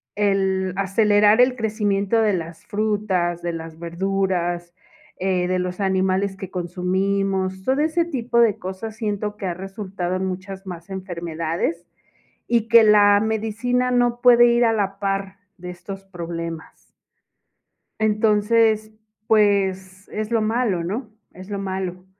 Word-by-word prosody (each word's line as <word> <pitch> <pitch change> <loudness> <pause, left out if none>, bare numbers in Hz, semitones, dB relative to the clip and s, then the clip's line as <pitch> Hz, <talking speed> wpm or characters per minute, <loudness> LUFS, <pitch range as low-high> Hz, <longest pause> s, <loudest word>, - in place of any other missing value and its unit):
el 190 -2 +1
acelerar 205 +2 +3
el 250 0 +5
crecimiento 210 -1 0
de 215 -2 +2
las 165 -2 -5
frutas, 205 -5 -1
de 170 -1 -3
las 165 -1 -8
verduras, 175 0 -2 0.4
eh, 185 -1 0
de 185 0 0
los 180 +1 -4
animales 190 0 +1
que 190 -1 -8
consumimos, 190 +1 -1
todo 260 +6 +1
ese 320 +3 +2
tipo 245 -7 -3
de 225 -3 +3
cosas, 200 +4 -6
siento 210 -1 -3
que 200 - -5
ha 180 - -1
resultado 190 -1 -4
en 190 - -2
muchas 190 +1 -6
más 175 0 -8
enfermedades, 170 -2 -3 0.6
y 230 -1 +1
que 230 -1 +8
la 205 -1 +6
medicina 225 +4 -1
no 245 -1 +1
puede 240 -1 +7
ir 240 0 +4
a 230 - +4
la 195 -2 -1
par 195 -1 -2 0.2
de 180 0 -7
estos 195 +2 -9
problemas. 170 -3 -7 1.1
Entonces, 215 0 +2 0.4
pues, 195 -3 +1
es 215 +1 -4
lo 230 -1 +2
malo 215 -5 0
¿no? 215 +7 -4 0.2
es 185 +3 -12
lo 200 - -3
malo, 185 -2 -4
195 Hz, 140 wpm, -22 LUFS, 185-215 Hz, 1.1 s, que